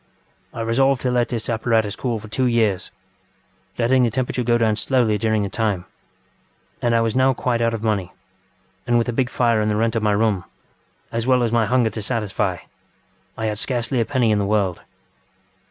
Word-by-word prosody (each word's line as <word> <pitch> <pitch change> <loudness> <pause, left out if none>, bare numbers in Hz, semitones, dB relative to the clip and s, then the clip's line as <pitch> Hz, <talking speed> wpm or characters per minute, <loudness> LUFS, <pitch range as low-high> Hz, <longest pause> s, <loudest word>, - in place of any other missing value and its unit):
I - - -6
resolved 130 +3 +2
to 125 - +1
let 120 -1 +1
this 115 -2 -3
apparatus 110 -2 0
cool 120 -3 -2
for 110 0 -10
two 125 +4 0
years, 110 -6 +1 0.9
letting 125 +2 +3
the 120 - +3
temperature 125 +2 -2
go 120 0 +2
down 110 -2 +2
slowly 110 -2 +1
during 110 0 +1
the - - -1
time. 100 -3 -1 1.0
And 120 -1 +2
I 115 - +3
was 115 0 -1
now 130 0 +3
quite 120 -2 -1
out 115 0 +1
of 110 - -7
money; 100 -5 -1 0.8
and 120 - +3
with 115 - +1
a - - -1
big 125 +1 0
fire 115 -4 +2
and 105 - 0
the 105 - +1
rent 115 +2 0
of 115 - +1
my 105 -1 +2
room, 100 -3 +1 0.7
as 115 +1 -2
well 130 -1 +4
as 115 - 0
my 115 -2 +2
hunger 125 -3 +2
to 110 - -5
satisfy, 105 -2 -1 0.8
I 110 - -3
had 105 -1 -2
scarcely 120 0 -1
a - - 0
penny 125 -4 +1
in 105 - +2
the 100 - 0
world. 100 -5 0
115 Hz, 205 wpm, -21 LUFS, 110-120 Hz, 1.0 s, well